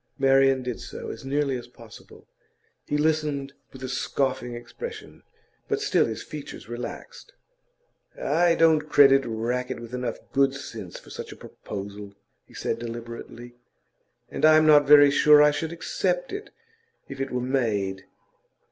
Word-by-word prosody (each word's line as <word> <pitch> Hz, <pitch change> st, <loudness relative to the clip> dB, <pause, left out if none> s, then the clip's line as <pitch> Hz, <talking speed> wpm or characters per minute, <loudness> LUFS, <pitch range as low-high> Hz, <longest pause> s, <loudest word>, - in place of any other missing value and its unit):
Marian 135 Hz, -1 st, +4 dB
did 125 Hz, -1 st, -4 dB
so, 125 Hz, -, -7 dB
as -, -, -10 dB
nearly 140 Hz, 0 st, 0 dB
as 120 Hz, -, -12 dB
possible. 115 Hz, -2 st, -15 dB, 0.6 s
He 145 Hz, -, 0 dB
listened 150 Hz, -3 st, 0 dB, 0.2 s
with 130 Hz, -1 st, -11 dB
a -, -, -3 dB
scoffing 130 Hz, -1 st, -2 dB
expression, 430 Hz, -, -9 dB, 0.5 s
but 425 Hz, -, -1 dB
still 420 Hz, -, +2 dB
his -, -, -5 dB
features -, -, -9 dB
relaxed. -, -, -8 dB, 0.9 s
'I 175 Hz, -, +2 dB
don't 155 Hz, -2 st, +3 dB
credit 135 Hz, -2 st, +6 dB
Rackett 120 Hz, +3 st, -3 dB
with 120 Hz, +1 st, -10 dB
enough 125 Hz, -2 st, -3 dB, 0.2 s
good 135 Hz, 0 st, +3 dB
sense 140 Hz, -, -8 dB
for -, -, -14 dB
such -, -, -7 dB
a -, -, -9 dB
proposal,' 100 Hz, 0 st, -8 dB, 0.3 s
he -, -, -18 dB
said 115 Hz, -, -3 dB
deliberately. 120 Hz, +1 st, -8 dB, 0.8 s
'And -, -, -6 dB
I'm 155 Hz, 0 st, +6 dB
not 150 Hz, -2 st, +6 dB
very 145 Hz, -1 st, +8 dB
sure 150 Hz, +1 st, +6 dB
that 150 Hz, -, +7 dB
I 150 Hz, -, +5 dB
should 155 Hz, +2 st, -3 dB
accept 180 Hz, -, -2 dB
it 410 Hz, +1 st, -6 dB, 0.6 s
if 135 Hz, -1 st, -7 dB
it 135 Hz, -, -2 dB
were 125 Hz, -, -2 dB
made. 110 Hz, -7 st, -1 dB
135 Hz, 150 wpm, -25 LUFS, 120-150 Hz, 0.9 s, very